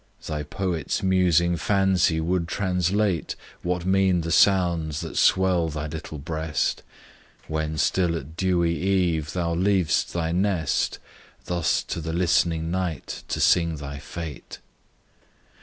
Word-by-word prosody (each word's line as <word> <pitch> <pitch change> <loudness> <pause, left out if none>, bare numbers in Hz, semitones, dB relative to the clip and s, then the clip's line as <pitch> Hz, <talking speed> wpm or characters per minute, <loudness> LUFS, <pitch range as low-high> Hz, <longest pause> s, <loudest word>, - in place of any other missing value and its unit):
Thy 75 -1 -3
poet's 85 +5 -3
musing 85 -2 +3
fancy 95 +1 +2
would 85 +1 0
translate 95 0 0 0.3
What 90 0 -2
mean 95 -2 +3
the 85 0 -4
sounds 85 -3 +3
that - - -7
swell 90 -3 +3
thy 75 0 -4
little 80 0 -6
breast, 80 +1 -2 0.7
When 80 0 -2
still 85 0 +1
at 80 +1 -9
dewy 85 -2 +1
eve 90 -5 0
thou 85 -2 -1
leav'st 95 -1 +1
thy 80 -1 -1
nest, 90 -1 0 0.5
Thus 85 -3 0
to 85 - -4
the 80 +1 -4
listening 85 -2 +1
night 90 -4 -3
to - - -3
sing 85 -2 +3
thy 70 -1 -7
fate? 80 0 -8
85 Hz, 125 wpm, -24 LUFS, 80-90 Hz, 0.7 s, musing